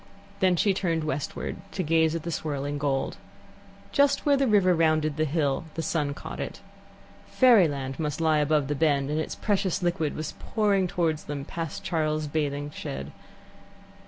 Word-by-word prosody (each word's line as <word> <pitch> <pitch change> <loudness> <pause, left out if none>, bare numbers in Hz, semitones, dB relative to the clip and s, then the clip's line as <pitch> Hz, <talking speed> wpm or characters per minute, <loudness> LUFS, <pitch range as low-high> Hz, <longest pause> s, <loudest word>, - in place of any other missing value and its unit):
Then 185 -1 +4
she 195 +3 +3
turned 165 -4 -1
westward, 150 -2 -3 0.2
to 185 - -1
gaze 160 0 +2
at 165 - -4
the 170 - -3
swirling 145 -2 -3
gold. 140 -2 -1 0.7
Just 280 -1 +3
where 290 -1 +5
the 275 -1 +2
river 200 -4 +4
rounded 155 -2 +2
the 155 0 +1
hill 145 -1 0
the 165 - -2
sun 150 -3 -1
caught - - -8
it. - - -5 0.7
Fairyland 150 - +3
must 150 -1 -2
lie 160 -2 +3
above 150 -1 +2
the 145 - 0
bend, 145 -1 +1
and 155 - 0
its 160 - -3
precious 195 -3 0
liquid 170 -4 0
was 155 0 -4
pouring 205 -4 +1
towards 165 -3 -1
them 145 -1 -5
past 165 -1 -5
Charles's 155 -2 -1
bathing 145 -1 -2
shed. 70 - -6
155 Hz, 165 wpm, -27 LUFS, 145-175 Hz, 0.7 s, where